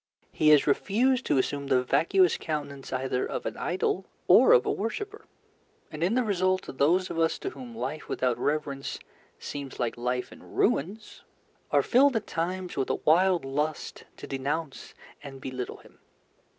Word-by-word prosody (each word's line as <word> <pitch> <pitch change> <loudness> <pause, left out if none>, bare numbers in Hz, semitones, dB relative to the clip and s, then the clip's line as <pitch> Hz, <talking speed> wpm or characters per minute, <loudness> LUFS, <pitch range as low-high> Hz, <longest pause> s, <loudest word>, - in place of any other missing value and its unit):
He 155 - +3
has 150 -2 +6
refused 245 - +1
to 145 - +2
assume 140 +2 -1
the 130 -2 +3
vacuous 180 +7 +3
countenance 145 -3 -5
either 130 0 -1
of - - -4
an - - -3
idol 185 +1 -1 0.2
or - - +7
a - - +9
worshipper, 415 - -4 0.6
and 155 +1 -4
in 190 +7 +2
the 255 - +2
result 185 -3 +1 0.2
those 180 +6 +3
of 165 - -3
us 165 0 +2
to 390 - -5
whom 245 -8 -10
life 155 -7 -5
without 125 -2 0
reverence 145 -2 -2 0.4
seems 140 -2 -7
like 120 -2 -1
life 125 +1 -2
in - - -13
ruins 200 +9 -1 0.5
are - - +3
filled 270 +1 +4
at 225 - -1
times 180 +2 -3
with 135 - -1
a - - +1
wild 180 +1 +3
lust 150 +3 -3
to - - -8
denounce 140 +2 -4 0.3
and 135 -1 -9
belittle 130 -1 -5
him. - - -20
160 Hz, 165 wpm, -27 LUFS, 140-195 Hz, 0.6 s, a